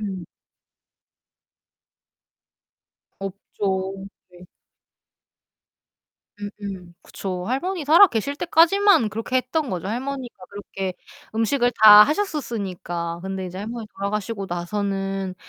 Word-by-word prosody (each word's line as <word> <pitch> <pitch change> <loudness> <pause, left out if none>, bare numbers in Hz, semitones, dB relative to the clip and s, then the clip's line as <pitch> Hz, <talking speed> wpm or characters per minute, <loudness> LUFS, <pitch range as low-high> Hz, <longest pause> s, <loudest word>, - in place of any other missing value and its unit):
음. 190 -4 -5 2.9
없죠. 195 0 -4 0.2
네. 180 0 -15 1.9
음음 200 -4 -8
그쵸. 185 -2 -5
할머니 315 +6 -2
살아 335 +7 +8
계실 280 - -2
때까지만 340 - +4
그렇게 225 +4 -2
했던 270 +3 -1
거죠. 185 -1 -4
할머니가 255 +2 -4 0.2
그렇게 195 -2 -5 0.4
음식을 245 +2 +1
다 210 -1 +11
하셨었으니까. 200 - -3
근데 190 -1 -4
이제 180 +1 -8
할머니 225 +2 -6
돌아가시고 200 0 -3
나서는 195 +1 -3
205 Hz, 225 characters per minute, -23 LUFS, 190-255 Hz, 2.9 s, 다